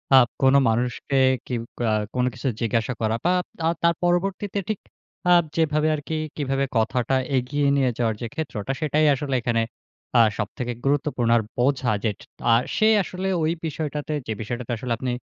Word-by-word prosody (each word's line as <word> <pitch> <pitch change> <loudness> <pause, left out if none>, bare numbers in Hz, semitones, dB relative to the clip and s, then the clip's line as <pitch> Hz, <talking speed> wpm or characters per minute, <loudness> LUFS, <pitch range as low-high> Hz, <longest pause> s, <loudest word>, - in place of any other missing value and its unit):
আ - - +10 0.2
কোন 135 0 +5 0.2
মানুষকে 125 +4 0 0.3
কিউ 120 -2 -2 0.2
কা 120 -2 +1 0.3
কোন 125 0 +2
কিছু 135 - -4
জিজ্ঞাসা 115 +1 0
করা 110 0 +1
বা 175 - +4
আ - - 0 0.2
তা 165 - 0 0.2
তার 170 0 +4
পরবর্তীতে 190 +3 0
ঠিক 215 - -1 0.5
আ - - +6 0.2
যেভাবে 155 -1 +2
আরকি 150 +2 -5 0.2
কিভাবে 135 -2 0
কথাটা 125 +3 +1 0.2
এগিয়ে 140 +3 0
নিয়ে 135 -2 +3
যাওয়ার 115 -3 +1
যে 120 - -2
ক্ষেত্রটা 135 -7 -4
সেটাই 155 0 +2
আসলে 135 0 -2
এখানে 115 -1 +1 0.6
আ - - +9 0.2
সবথেকে 120 +3 -3
গুরুত্বপূর্ণ। 140 -4 +1
আর - - +2 0.2
বোঝা 130 -1 +2
যেট 105 -3 -1 0.3
আর 115 - +5
সে 215 - +4 0.2
আসলে 185 +1 -4 0.2
ওই 155 - +2
বিষয়টাতে 150 -1 -3
যে 110 - -1
বিষয়টাতে 120 +2 -4
আসলে 125 +2 -5
আপনি 130 0 -2
135 Hz, 170 wpm, -24 LUFS, 120-155 Hz, 0.6 s, আ